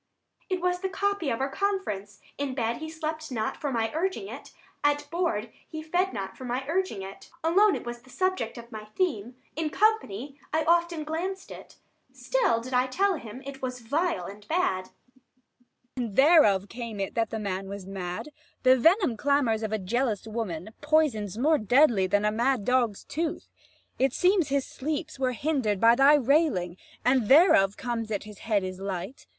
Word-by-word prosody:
Adr. 375 - +1
It - - -10
was 360 0 +1
the 380 +1 -2
copy 400 -4 -1
of 230 - -1
our 270 +1 -1
conference: 210 - -2 0.2
In 280 -2 -2
bed, 235 -2 -1
he 315 0 -6
slept 315 -1 -5
not 220 -3 -2
for 285 - -3
my 225 -2 0
urging 375 +4 -2
it; - - -9 0.3
At 290 0 +1
board, 285 -11 -1 0.2
he 315 0 -6
fed 355 +4 0
not 195 -4 -5
for - - -10
my 250 +2 -3
urging 330 - -1
it; 195 +1 -10
Alone, 390 +5 +4
it - - -6
was 240 0 -6
the 255 - -20
subject 370 -9 -1
of 235 0 -11
my 215 -1 -7
theme; 240 - -2 0.2
65 325 - -2
In 310 - -1
company 290 - 0
I 315 +1 +1
often 340 -1 +2
glanced 360 +5 -4
it; - - -11 0.3
Still - - +1
did 255 +2 -8
I 250 +1 +3
tell 390 +9 +1
him 235 +1 -9
it 275 -1 -8
was 250 -1 -4
vile 320 +9 -1
and 205 +1 -10
bad. 310 - 0
Abb. - - -21 1.0
And 235 -6 -3
thereof 265 - +5
came 230 -2 -7
it 195 - -3
that 225 -2 0
the 225 - -3
man 195 -2 -3
was 200 -1 -7
mad: 185 +5 -5 0.3
The 255 0 +7
venom 325 - +3
clamours 265 -4 +2
of 220 -1 -3
a 220 - +1
jealous 220 +2 -1
woman, 215 -5 -4
Poisons 285 - +1
more 300 +5 +3
deadly 230 -3 +4
than 205 +2 +1
a 210 - +3
mad 235 0 +1
dog's 245 -5 +1
tooth. 320 +1 -4 0.5
70 265 - +4
It 270 - -1
seems 365 -3 +3
his 275 -1 +1
sleeps 305 +1 -4
were 255 -1 +1
hinder'd 245 -7 0
by 230 +2 +6
thy 275 +4 +6
railing: 270 - +2 0.3
And 250 -3 +3
thereof 270 - +6
comes 235 -3 -3
it 215 - 0
that 200 - -4
his 210 -1 -12
head 210 -3 0
is 185 0 -5
light. 195 +5 -5
255 Hz, 195 wpm, -27 LUFS, 215-315 Hz, 1.0 s, The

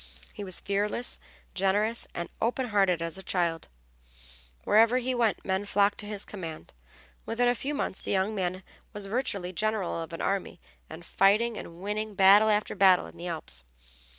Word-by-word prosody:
He 205 - -7
was 185 -2 -2
fearless, 205 +4 -1 0.3
generous, 205 +4 +1
and 170 - -3
as - - -32
open 245 +2 0
hearted 195 -5 +2
as 165 +2 -3
a - - -5
child; 170 -4 -1 1.0
wherever 225 +3 +5
he 255 +1 -1
went 235 -4 0
men 190 +1 0
flocked 200 0 +2
to 210 - -5
his 205 -1 -3
command; 165 -6 -8 0.5
within 245 +2 +1
a 245 - +4
few 280 +4 -3
months 190 - -3
the - - -7
young 195 +2 +1
man 185 -2 -2 0.3
was 205 -2 -6
virtually 200 -5 -2
general 200 -2 -1
of 165 - -7
an 165 - -6
army, 195 -2 -2 0.3
and 165 +2 -10
fighting 215 +6 +3
and 170 -3 -9
winning 210 +1 -3
battle 200 +3 +7
after 210 -1 +1
battle 190 -2 +5
in - - -12
the 175 - -7
Alps. 155 - -5
200 Hz, 180 wpm, -28 LUFS, 180-215 Hz, 1.0 s, battle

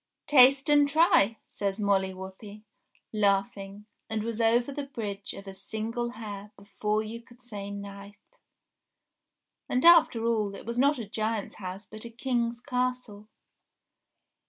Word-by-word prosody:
"Taste 270 -1 +6
and 290 -1 +5
try," 280 - +4
says 200 0 -2
Molly 195 -2 +2
Whuppie, 190 +3 -10 0.5
laughing, 200 0 0 0.2
and 220 -1 -2
was 230 0 -3
over 235 +4 +3
the 280 0 -5
Bridge 205 -6 -5
of 195 - -10
a 195 - -8
Single 230 +4 -4
Hair 210 -3 -8
before 210 +2 -2
you 225 +2 -7
could 240 +1 -19
say 210 -5 -7
knife. 200 0 -8 1.5
And, 250 +4 +1
after 325 -9 +6
all, 215 -4 0
it - - -10
was 235 +2 -3
not 285 +2 +4
a 230 - -5
giant's 215 0 -3
house 190 0 -7
but 215 0 -10
a 235 - -7
King's 235 0 -1
castle. 250 -5 -3
220 Hz, 140 wpm, -28 LUFS, 200-245 Hz, 1.5 s, Taste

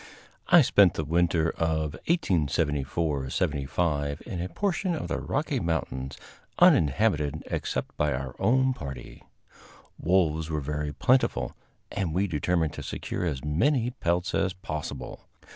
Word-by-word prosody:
I 175 -4 +7
spent 100 -7 +5
the 80 - -1
winter 85 0 +2
of 80 -2 -1 0.2
1874 75 - 0
75 75 -1 -1
in 90 -7 -4
a 90 - -3
portion 190 - -1
of 155 - -5
the - - -1
Rocky 145 -2 -1
Mountains 70 - -3 0.4
uninhabited 75 -2 +3
except - - -3
by 75 0 +1
our 65 -1 -4
own 130 +2 +3
party. 70 - -8 0.8
Wolves 80 -3 +1
were 75 -1 -1
very 75 +1 -3
plentiful, 75 - +1 0.4
and 90 -5 -2
we 95 +2 +2
determined 85 -2 0
to - - -6
secure - - -4
as 75 -5 -3
many 120 - +2
pelts 90 -5 -1
as 95 -1 +1
possible. 75 -7 -6
80 Hz, 130 wpm, -27 LUFS, 75-95 Hz, 0.8 s, I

